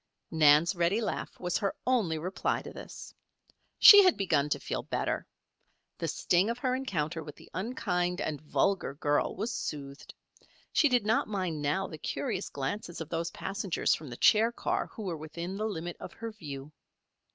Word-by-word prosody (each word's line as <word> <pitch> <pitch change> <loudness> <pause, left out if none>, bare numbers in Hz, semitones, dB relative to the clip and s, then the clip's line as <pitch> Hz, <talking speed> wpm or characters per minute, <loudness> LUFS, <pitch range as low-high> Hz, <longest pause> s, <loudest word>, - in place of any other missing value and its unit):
Nan's 155 +2 +5
ready 175 +4 +1
laugh 225 - -4
was 180 -1 -1
her 200 -3 -1
only 220 -11 +1
reply 180 +5 -2
to - - -9
this. - - -10 0.6
She 410 -1 +11
had 370 -2 +4
begun 155 -8 +1
to - - 0
feel - - -3
better. - - -2 0.7
The - - -2
sting 180 +5 +2
of 235 - -2
her 250 0 0
encounter 165 - -2
with 150 -1 -10
the - - -17
unkind 180 -3 -1
and 150 -7 -3
vulgar 165 -1 0
girl 145 0 0
was 225 +4 -3
soothed. 140 -6 -6 0.6
She 300 - +4
did 245 -4 +2
not 220 +2 +2
mind 185 -7 -2
now 150 +7 0
the 155 - -9
curious 140 - -3
glances 165 +6 -4
of 160 -2 -6
those 165 0 -2
passengers 195 0 -1
from 155 -3 -5
the 120 - -8
chair 225 +2 +5
car - - -2
who 220 - -9
were 175 -5 -3
within 170 +4 -6
the 215 +2 -2
limit 175 -5 -4
of - - -8
her 230 0 -6
view. 145 -8 -8
175 Hz, 175 wpm, -30 LUFS, 155-210 Hz, 0.7 s, She